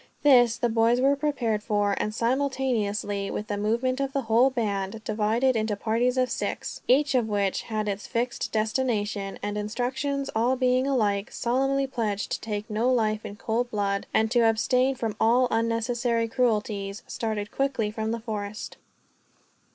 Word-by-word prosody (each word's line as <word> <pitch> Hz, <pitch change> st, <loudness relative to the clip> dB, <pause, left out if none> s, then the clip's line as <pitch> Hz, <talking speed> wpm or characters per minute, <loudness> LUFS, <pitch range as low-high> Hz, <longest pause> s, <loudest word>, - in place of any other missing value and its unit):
This 245 Hz, -5 st, +6 dB
the 240 Hz, -, +1 dB
boys 230 Hz, +1 st, +3 dB
were 275 Hz, +2 st, +4 dB
prepared 275 Hz, -7 st, -1 dB
for, 205 Hz, -2 st, +1 dB
and 210 Hz, -, -1 dB
simultaneously 230 Hz, -5 st, -1 dB
with 210 Hz, -, -4 dB
the 205 Hz, -, -1 dB
movement 235 Hz, +6 st, 0 dB
the 275 Hz, 0 st, -1 dB
whole 230 Hz, +4 st, +4 dB
band 215 Hz, -3 st, -2 dB
divided 225 Hz, +5 st, +1 dB
into 215 Hz, -1 st, 0 dB
parties 235 Hz, +5 st, 0 dB
of 255 Hz, 0 st, +1 dB
six, -, -, -3 dB
each 280 Hz, +3 st, +4 dB
of 245 Hz, -4 st, +2 dB
which 200 Hz, -2 st, 0 dB
had 215 Hz, -2 st, -3 dB
its 200 Hz, 0 st, -3 dB
fixed 240 Hz, +1 st, -2 dB
destination 215 Hz, -3 st, -1 dB
and 205 Hz, 0 st, -2 dB
instructions, 260 Hz, +6 st, -2 dB
all 240 Hz, +4 st, +2 dB
being 255 Hz, +1 st, +2 dB
alike 210 Hz, -6 st, 0 dB
solemnly 270 Hz, +3 st, +1 dB
pledged 225 Hz, -6 st, -2 dB
to -, -, -2 dB
take 210 Hz, -1 st, -4 dB
no 225 Hz, +4 st, +1 dB
life 215 Hz, -3 st, +1 dB
in 200 Hz, -, -7 dB
cold 230 Hz, +3 st, -1 dB
blood, 200 Hz, -3 st, -1 dB
and 220 Hz, 0 st, +2 dB
to 245 Hz, -, +3 dB
abstain 255 Hz, +4 st, +2 dB
from 225 Hz, -4 st, -3 dB
all 245 Hz, +3 st, +4 dB
unnecessary 230 Hz, +1 st, 0 dB
cruelties 210 Hz, -4 st, -1 dB
started 215 Hz, -2 st, -3 dB
quickly 265 Hz, -6 st, -1 dB
from 220 Hz, 0 st, -3 dB
the 230 Hz, +1 st, -2 dB
forest. 215 Hz, -2 st, -5 dB
225 Hz, 160 wpm, -26 LUFS, 210-250 Hz, -, This